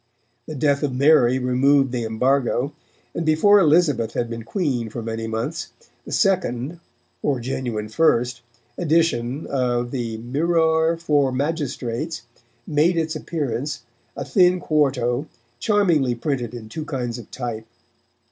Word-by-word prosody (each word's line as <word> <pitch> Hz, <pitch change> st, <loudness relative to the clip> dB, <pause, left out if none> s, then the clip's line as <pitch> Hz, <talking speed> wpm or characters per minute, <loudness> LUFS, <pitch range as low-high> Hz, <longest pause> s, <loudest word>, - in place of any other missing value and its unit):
The 155 Hz, -, -6 dB
death 140 Hz, 0 st, +1 dB
of 140 Hz, -4 st, -1 dB
Mary 135 Hz, -3 st, +5 dB
removed 130 Hz, +2 st, +3 dB
the 120 Hz, -2 st, -2 dB
embargo, 125 Hz, +4 st, +1 dB, 0.4 s
and 170 Hz, -, -2 dB
before 165 Hz, +7 st, +5 dB
Elizabeth 150 Hz, -, +3 dB
had 120 Hz, -1 st, -2 dB
been 115 Hz, 0 st, -5 dB
Queen 125 Hz, -, -2 dB
for 115 Hz, +1 st, -6 dB
many 115 Hz, 0 st, -4 dB
months, 120 Hz, +9 st, -4 dB, 0.3 s
the -, -, -7 dB
second 170 Hz, -, 0 dB, 0.4 s
(or 140 Hz, -3 st, 0 dB
genuine 120 Hz, -3 st, -3 dB
first) 120 Hz, -1 st, +1 dB, 0.4 s
edition 155 Hz, -6 st, +1 dB
of 120 Hz, -2 st, -1 dB
the 115 Hz, -4 st, -3 dB
Myrroure 160 Hz, +6 st, +1 dB
for 145 Hz, -5 st, +2 dB
Magistrates 140 Hz, -1 st, -3 dB, 0.4 s
made 160 Hz, +3 st, +2 dB
its 160 Hz, -1 st, -1 dB
appearance, 145 Hz, -4 st, -3 dB, 0.3 s
a -, -, -4 dB
thin 180 Hz, -2 st, +4 dB
quarto, 135 Hz, -4 st, +1 dB, 0.3 s
charmingly 170 Hz, -, +2 dB
printed 120 Hz, -2 st, -3 dB
in 115 Hz, -2 st, -8 dB
two 155 Hz, +8 st, -6 dB
kinds 125 Hz, -4 st, -3 dB
of 115 Hz, -, -12 dB
type. 115 Hz, -3 st, -5 dB
135 Hz, 130 wpm, -22 LUFS, 120-160 Hz, 0.4 s, Mary